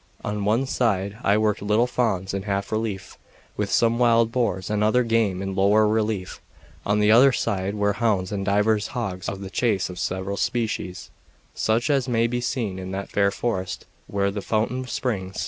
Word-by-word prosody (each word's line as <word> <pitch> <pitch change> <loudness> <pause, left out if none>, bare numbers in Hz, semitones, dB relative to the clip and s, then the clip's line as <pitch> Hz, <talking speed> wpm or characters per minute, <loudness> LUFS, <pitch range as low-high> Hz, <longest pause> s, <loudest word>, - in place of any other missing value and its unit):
On 105 -1 -2
one 115 +6 +2
side 105 -5 -1
I 100 +1 +3
worked 110 -1 +1
little 105 +4 +2
fawns 110 -7 -1
in 100 - -2
half 100 0 -3
relief, 110 -3 -3 0.4
with 105 -1 -2
some 115 0 +2
wild 115 -1 +4
boars 105 -7 -1
and 105 0 +1
other 125 +4 +3
game 110 -5 +1
in 95 0 -3
lower 105 +3 +4
relief; 105 -3 -1 0.5
on 105 +1 +2
the 105 0 +4
other 130 +5 +7
side 100 -4 -1
were 100 -1 +1
hounds 100 -3 0
and 100 -2 -2
divers 105 +2 +1
dogs 95 -7 -3
of 100 0 -6
the 95 -1 -7
chase 100 -7 0
of 90 - -8
several 95 +2 -3
species, 110 -6 -2 0.4
such 115 +6 +1
as 135 -3 +1
may 115 -2 +2
be 120 +1 -1
seen 115 -6 -2
in 95 0 -6
that 95 +1 -5
fair 100 -1 +3
forest 95 -4 -3 0.2
where 100 -1 0
the 100 0 -4
fountain 120 +5 -1
springs. 95 -8 -3
105 Hz, 185 wpm, -24 LUFS, 95-115 Hz, 0.5 s, other